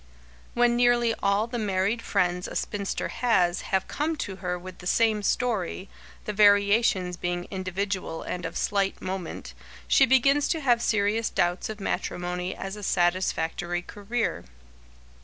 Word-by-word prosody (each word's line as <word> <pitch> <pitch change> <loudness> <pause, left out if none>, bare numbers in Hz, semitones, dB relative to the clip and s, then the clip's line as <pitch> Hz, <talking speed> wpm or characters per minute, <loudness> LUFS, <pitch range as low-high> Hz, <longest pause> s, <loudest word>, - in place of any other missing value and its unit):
When 240 0 +3
nearly 240 -1 +3
all 200 +2 +2
the 240 0 -4
married 205 +2 0
friends 180 -4 0
a - - -8
spinster 200 -2 -2
has 185 -8 +1
have 190 -1 -1
come 315 +2 -1
to 195 -10 -5
her 180 -1 -3
with 185 +1 -10
the 180 - -7
same 220 +1 +2
story, 200 -5 -1 0.4
the 210 - -3
variations 200 -2 +4
being 175 0 -2
individual 190 -2 -3
and 180 - -4
of - - -4
slight 195 -1 0
moment, 185 - -5 0.3
she - - +5
begins 275 +3 +4
to 325 - 0
have 240 -4 +3
serious 215 0 +1
doubts 175 +4 0
of 215 -1 -6
matrimony 180 -1 -3
as 195 +1 -6
a 210 - -9
satisfactory 175 -2 0
career. 205 - -3
200 Hz, 145 wpm, -26 LUFS, 180-230 Hz, 0.4 s, she